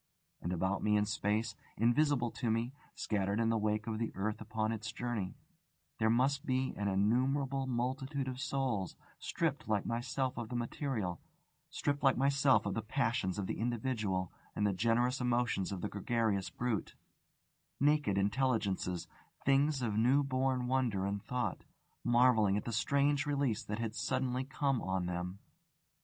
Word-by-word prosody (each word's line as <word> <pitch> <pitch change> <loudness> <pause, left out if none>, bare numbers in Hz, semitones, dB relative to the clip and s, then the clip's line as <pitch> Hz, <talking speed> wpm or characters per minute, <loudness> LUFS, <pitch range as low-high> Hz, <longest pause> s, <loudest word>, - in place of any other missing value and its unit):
And 85 - -3
about 95 +3 0
me 105 0 +3
in 105 - +2
space, 105 0 0 0.2
invisible 120 +2 +3
to 120 - -2
me, 115 +3 0 0.2
scattered 100 0 0
in 115 -1 +2
the 115 - +2
wake 105 0 0
of 110 -2 -3
the 115 - -1
earth 105 +3 -2
upon 110 0 -1
its 110 +1 -4
journey, 115 -6 -3 0.6
there 110 0 +3
must 135 +4 +2
be 130 0 0
an 100 - -1
innumerable 130 +7 +1
multitude 130 +3 -2
of 130 -1 -4
souls, 135 -9 -1 0.2
stripped - - -1
like 105 -2 +1
myself 125 +2 -1
of 115 -2 -5
the 125 - -4
material, 120 - -2 0.5
stripped 145 0 -1
like 135 -2 +4
myself 140 -1 +4
of 100 - -1
the 110 - -1
passions 115 -4 0
of 100 - -1
the - - -3
individual 110 -6 -1 0.2
and 105 - +1
the 100 - +2
generous 120 +6 +2
emotions 120 -6 +1
of 95 -3 -4
the - - -1
gregarious 105 -1 0
brute, 120 -4 -2 0.8
naked 145 -8 +3
intelligences, 100 -5 0 0.4
things 140 0 +3
of 110 -3 0
new 130 +5 +4
born 130 -1 0
wonder 125 -7 +1
and 100 0 -2
thought, 125 +2 -2 0.4
marvelling 120 -4 +4
at 105 - -3
the 115 - -3
strange 140 +5 +2
release 140 -6 +1
that 105 -1 -4
had 115 -2 -2
suddenly 130 +1 -1
come 135 -1 0
on 95 -1 -1
them! 90 +1 -3
115 Hz, 160 wpm, -34 LUFS, 105-130 Hz, 0.8 s, like